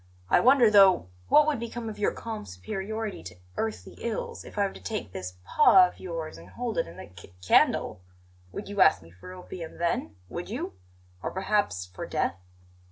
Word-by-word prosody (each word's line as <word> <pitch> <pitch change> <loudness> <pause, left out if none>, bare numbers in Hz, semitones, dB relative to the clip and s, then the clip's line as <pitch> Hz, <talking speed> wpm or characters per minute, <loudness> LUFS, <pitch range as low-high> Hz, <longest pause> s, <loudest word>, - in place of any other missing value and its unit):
I - - +6
wonder, 250 -3 +6
though, 195 - +6 0.2
what 300 - +6
would 300 -5 0
become 235 0 -5
of 215 - -6
your 205 - +2
calm 225 -1 -6
superiority 195 - -5
to 90 -1 -10 0.2
earthly 220 -1 -4
ills 230 -2 -4
if - - -13
I 200 - +3
were 195 - -4
to - - -12
take 215 - -4
this 90 0 -6
paw 190 - +7
of - - -13
yours 165 -3 -6
and - - -14
hold 240 -2 -3
it - - 0
in 85 - -12
the - - -10
c 90 - -14
candle. 90 0 +3 0.5
Would 200 - -6
you 205 0 -1
ask 155 - +5
me 85 - -16
for 90 - -12
opium 180 -2 -8
then? 170 -10 -1
Would - - -6
you? - - -4 0.5
Or - - -2
perhaps 190 - 0
for 90 +1 -8
death? 85 - -1
190 Hz, 195 wpm, -27 LUFS, -, 0.5 s, paw